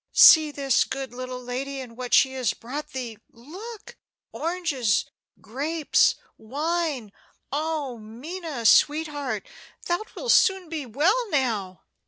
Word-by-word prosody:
See 315 -2 +8
this 275 -3 +2
good 265 -2 -5
little 255 0 -6
lady, 270 +3 -4
and 245 -3 -9
what 250 0 -6
she 265 -1 +4
has 255 -5 -1
brought 290 +6 -6
thee. 250 -6 -6
Look! 385 - -11 0.3
oranges 310 - 0 0.3
grapes 295 +7 +1 0.2
wine! 290 -1 -2 0.4
Oh, 295 -4 -2
Minna, 270 +5 -7
sweetheart, 295 - +2 0.4
thou 350 +2 0
wilt - - 0
soon 380 -5 +4
be 310 -5 -4
well 385 - +1
now!" 220 - -1
280 Hz, 120 wpm, -25 LUFS, 245-320 Hz, 0.4 s, See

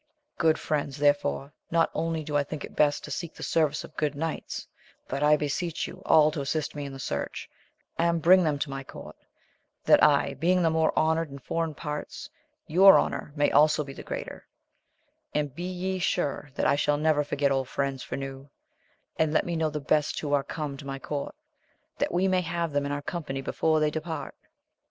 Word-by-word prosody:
Good 160 -1 +4
friends, 145 -2 -2
therefore, 145 0 +1 0.2
not 165 0 +2
only 165 0 -1
do 150 0 -4
I 145 - +3
think 145 +1 -6
it - - -15
best 145 -1 +2
to - - -8
seek 170 -2 -5
the - - -8
service 155 -2 +1
of 155 - -12
good 150 -2 0
knights, 160 +2 -4 0.4
but 135 +2 -3
I 150 0 +5
beseech 155 +3 -2
ye - - -8
all 155 -1 +6
to 150 -2 -3
assist 150 +2 -2
me 145 -1 -5
in 140 - -6
the - - -7
search, 70 - -4 0.5
and 170 0 +2
bring 180 +3 +6
them 150 -3 +1
to 140 - -3
my 135 0 -5
court, - - -11 0.7
that - - +6
I 145 -2 +4
being 175 +6 +2
the 165 - +3
more 160 0 +2
honoured 160 0 +2
in 140 - -8
foreign 160 +3 -3
parts, 150 -1 -6 0.4
your 190 +4 +7
honour - - -2
may 145 -1 +2
also 150 +1 +4
be 135 -1 -9
the - - -9
greater: - - -7 0.9
and 145 -3 0
be 175 +4 -5
ye 185 +1 -3
sure 145 -4 -1
that - - 0
I - - +4 0.2
never 150 0 +2
shall 145 - -17
forget 140 -1 +1
old 135 -1 0
friends 135 -2 -2
for - - -5
new; 135 0 -7 0.7
and 160 -1 +2
let 155 - +2
me 175 - -2
know 160 -1 +1
the 150 0 -4
best 150 +1 +1
who 145 -2 -2
are 140 -1 +3
come 145 -2 -5
to 140 0 -10
my 135 0 -4
court, 145 - -5 0.6
that 285 - 0
we 180 +2 +2
may 185 -1 +2
have 170 -1 -2
them 140 0 0
in - - -3
our 145 0 -3
company 145 -5 -4
before 155 +3 +1
they 150 0 +2
depart. 160 +1 -5
150 Hz, 205 wpm, -27 LUFS, 140-165 Hz, 0.9 s, your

